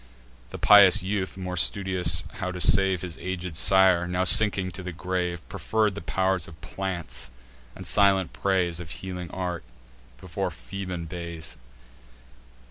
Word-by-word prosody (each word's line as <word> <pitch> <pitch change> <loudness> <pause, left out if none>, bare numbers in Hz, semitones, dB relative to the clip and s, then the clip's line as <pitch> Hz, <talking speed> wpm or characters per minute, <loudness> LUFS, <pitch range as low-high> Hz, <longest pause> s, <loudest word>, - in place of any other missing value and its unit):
The - - -8
pious 100 -3 +7
youth, 95 -1 -3
more 90 -1 -5
studious 90 -2 +2 0.2
how 95 -2 -3
to 90 - -7
save 95 0 +4
His 90 -3 -7
aged 90 -2 -5
sire, 95 0 +4
now 90 +1 -1
sinking 95 -1 +2
to 95 - -8
the 90 0 -6
grave, 90 0 -4
Preferr'd 110 -2 -1
the 100 - -7
pow'r 95 +2 0
of 80 -1 -14
plants, 85 -10 -4 0.5
and - - -10
silent 100 -3 +3
praise 90 -3 0
Of 85 -2 -8
healing 90 0 -7
arts, 90 -4 -4 0.6
before - - -4
Phoebean 90 +8 -7
bays. 85 -1 -6
90 Hz, 140 wpm, -25 LUFS, 85-95 Hz, 0.6 s, pious